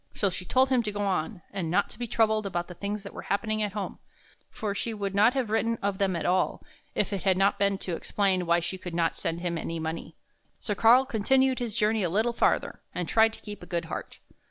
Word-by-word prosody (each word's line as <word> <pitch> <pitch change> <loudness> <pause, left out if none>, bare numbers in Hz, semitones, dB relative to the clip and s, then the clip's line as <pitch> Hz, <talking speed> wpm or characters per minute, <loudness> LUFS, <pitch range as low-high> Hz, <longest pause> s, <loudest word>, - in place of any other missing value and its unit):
So 200 -2 +1
she 180 +1 -6
told 260 +5 +3
him 255 -2 +3
to 215 -2 -3
go 205 0 -4
on, 185 -2 -1
and 185 -5 -2
not 175 - +1
to - - -11
be 240 - -3
troubled 220 -2 +2
about 175 -2 -2
the 180 - -8
things 200 +3 -4
that 200 - -9
were - - -7
happening 215 +1 0
at 205 -2 -1
home, 205 -2 -4 0.5
for 210 -2 -3
she 225 +2 -3
would 200 -2 -3
not 215 +6 +4
have 250 -5 -1
written 230 +1 +1
of 200 -1 -1
them 195 -2 +1
at 170 - -3
all 185 +1 +1 0.3
if - - 0
it 195 - -2
had 190 -2 +2
not 200 +1 +3
been 200 -1 +2
to 180 -3 -3
explain 190 -1 0
why 170 +1 +3
she 185 +2 -3
could 180 -2 -6
not 165 -1 +1
send 165 +1 -3
him 170 -2 -2
any 165 +1 -4
money. 160 +1 -5 0.4
So 210 - -2
Karl 235 +6 +6
continued 260 +2 +2
his 235 -4 -3
journey 215 0 +2
a 180 - +1
little 220 +7 +1
farther, - - +1
and 180 -2 -2
tried 225 0 +4
to - - -12
keep 210 -1 -8
a - - -10
good 170 -2 -2
heart. 160 - -6
200 Hz, 250 wpm, -28 LUFS, 180-220 Hz, 0.5 s, Karl